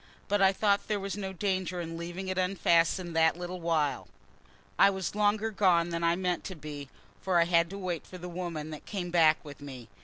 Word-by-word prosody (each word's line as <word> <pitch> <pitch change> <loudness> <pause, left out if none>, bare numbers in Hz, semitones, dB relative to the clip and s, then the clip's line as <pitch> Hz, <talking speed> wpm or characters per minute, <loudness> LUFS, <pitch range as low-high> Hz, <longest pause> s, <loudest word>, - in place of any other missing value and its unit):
But 205 0 +1
I 190 0 +6
thought 200 0 +1
there 210 -1 0
was 195 -1 -4
no 195 -2 -4
danger 185 -2 -2
in 165 -1 -5
leaving 175 +3 -6
it 185 0 -1
unfastened 175 -2 +2
that 160 0 +4
little 180 0 -6
while. 160 -4 0 0.7
I - - +8
was 190 -3 -3
longer 210 +1 +1
than 170 -3 +2
I 170 0 +3
meant 180 -1 -1
to 185 - -5
be, 145 -3 -8 0.3
for 185 -2 +2
I - - +6
had 170 -1 +3
to 195 - -7
wait 180 -4 -4
for 185 - -9
the 180 0 -7
woman 170 -3 -5
that 155 - -9
came 180 -4 -4
back 160 -2 +4
with 145 -1 -10
me. 130 -5 -9
175 Hz, 210 wpm, -29 LUFS, 165-190 Hz, 0.7 s, I